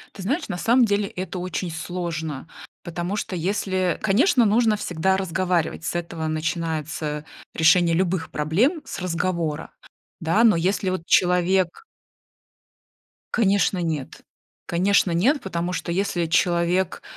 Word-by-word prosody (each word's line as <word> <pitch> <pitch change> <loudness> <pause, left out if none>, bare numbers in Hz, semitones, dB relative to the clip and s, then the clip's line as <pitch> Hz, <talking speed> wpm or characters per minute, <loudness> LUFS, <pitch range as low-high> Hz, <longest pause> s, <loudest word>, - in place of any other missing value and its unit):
Ты 195 - -8
знаешь, 280 - -1
на 180 -3 -4
самом 240 +5 +4
деле 205 -1 +1
это 185 -1 -5
очень 180 -1 -3
сложно, 160 -4 -4 0.4
потому 175 +3 -3
что, 195 - -4
если 185 0 -1
конечно, 245 - +3
нужно 220 +1 +3
всегда 190 -1 0
разговаривать, 180 -3 -1
с - - -2
этого 165 -2 -4
начинается 155 -1 -3 0.3
решение 165 +1 +4
любых 180 -2 0
проблем- 200 - +1
с - - -7
разговора, 170 -3 -2 0.5
да, 170 +8 +2
но 225 - +6
если 185 +3 0
вот 185 -3 -3
человек 180 - +2 1.5
Конечно, 200 -4 +2
нет. 160 -6 -4 0.4
Конечно, 190 +2 +2
нет, 235 - +2
потому 175 -1 -3
что 180 - -3
если 175 -2 0
человек 175 +2 +1
180 Hz, 125 wpm, -23 LUFS, 165-195 Hz, 1.5 s, но